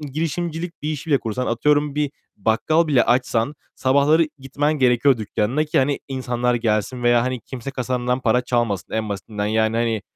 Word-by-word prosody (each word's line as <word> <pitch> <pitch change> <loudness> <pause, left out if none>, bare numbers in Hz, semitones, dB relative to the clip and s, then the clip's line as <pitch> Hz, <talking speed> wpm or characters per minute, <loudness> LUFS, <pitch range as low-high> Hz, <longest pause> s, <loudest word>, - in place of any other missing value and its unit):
girişimcilik 165 +3 -4
bir 150 - -2
işi 155 +1 -5
bile 140 - +4
kursan, 115 +3 -3
atıyorum 145 +4 +1
bir 150 -2 0 0.3
bakkal 115 +11 +2
bile 140 -5 +3
açsan 125 +2 +1 0.2
sabahları 145 +4 +3
gitmen 145 +3 -1
gerekiyor 125 +1 +4
dükkânına 110 +7 -1
ki, 150 - 0
hani, 140 +1 +1
insanlar 125 -2 -1
gelsin 115 +1 -1
veya, 120 0 +4
hani, 125 -1 -2
kimse 130 0 -7
kasandan 125 -1 -1
para 125 0 +2
çalmasın 120 -7 -1
en 110 -1 -1
basitinden. 105 +1 -4
Yani, 110 +1 +1
hani, 115 -3 0
125 Hz, 165 wpm, -21 LUFS, 115-145 Hz, 0.3 s, bile